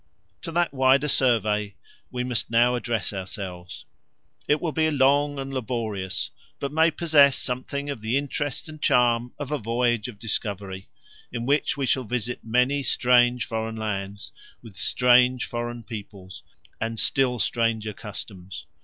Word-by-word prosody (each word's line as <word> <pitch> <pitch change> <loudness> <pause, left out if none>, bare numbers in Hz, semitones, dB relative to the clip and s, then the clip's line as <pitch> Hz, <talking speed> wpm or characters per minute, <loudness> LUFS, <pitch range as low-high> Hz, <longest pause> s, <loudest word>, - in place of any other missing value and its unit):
To 165 +1 -6
that 175 -1 +1
wider 135 +2 +4
survey 110 -7 +2 0.3
we 125 0 -3
must 125 -2 -1
now 120 +2 +4
address 120 -3 -1
ourselves. 95 -2 -7 0.6
It 150 - +3
will 170 - -2
be 155 +1 +2
long 145 0 +3
and 135 0 -5
laborious, 110 -7 -3 0.3
but 140 - -3
may 160 +2 +4
possess 150 -4 +4
something 135 +3 -3
of 140 -6 -4
the 110 +4 0
interest 145 0 -3
and 155 -1 -11
charm 120 0 +3
of 145 -1 -6
a 150 - 0
voyage 120 0 0
of 120 -4 -9
discovery, 100 -3 -4 0.4
in 120 -1 -4
which 145 +2 +1
we 140 - 0
shall 130 0 +1
visit 120 +1 -3
many 125 +5 +2
strange 125 -1 +3
foreign 110 0 -3
lands, 100 -2 -4 0.3
with 110 -5 -12
strange 125 +5 +4
foreign 120 0 -5
peoples, 100 -4 -9 0.4
and 115 0 -3
still 130 -2 +2
stranger 115 -2 0
customs. 95 -6 -8
120 Hz, 145 wpm, -25 LUFS, 110-135 Hz, 0.6 s, wider